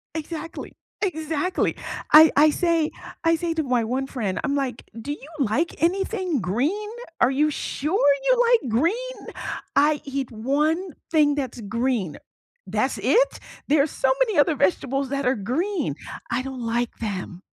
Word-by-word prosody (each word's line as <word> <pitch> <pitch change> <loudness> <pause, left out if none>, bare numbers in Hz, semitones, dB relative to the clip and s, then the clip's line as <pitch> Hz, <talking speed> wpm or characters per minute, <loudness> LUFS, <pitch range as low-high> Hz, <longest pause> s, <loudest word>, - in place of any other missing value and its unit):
Exactly. 320 +1 -6 0.3
Exactly! 320 -1 -1 0.3
I 310 +1 +10
I 300 +2 +7
say 335 -1 +1 0.3
I 330 0 +4
say 335 0 -1
to 320 -1 -1
my 250 -4 +1
one 260 +3 -1
friend, 215 -9 -3
I'm 280 -2 0
like, 265 -4 -2 0.2
"Do 290 +5 -3
you 295 0 -11
like 275 +9 0
anything 370 - 0
green? 290 - -1 0.3
Are 245 - +5
you 300 +3 +2
sure 300 +2 0 0.2
you - - +6 0.2
like 295 - +3
green?" 430 - 0 0.6
"I 295 +1 +4
eat 275 -2 -3
one 300 - 0 0.2
thing 295 -3 +4
that's 255 -4 -4
green." 225 - -1 0.5
"That's - - 0
it? - - +2 0.3
There 295 -1 +5
are 285 - +2
so - - 0
many 450 -6 +2
other 300 +1 +4
vegetables 275 -1 +1
that 275 0 -2
are 255 - +3
green." 275 - -1 0.4
"I 235 +2 +1
don't 265 -1 -6
like 235 +1 -1
them.'" 190 -4 -5
290 Hz, 155 wpm, -24 LUFS, 250-330 Hz, 0.6 s, I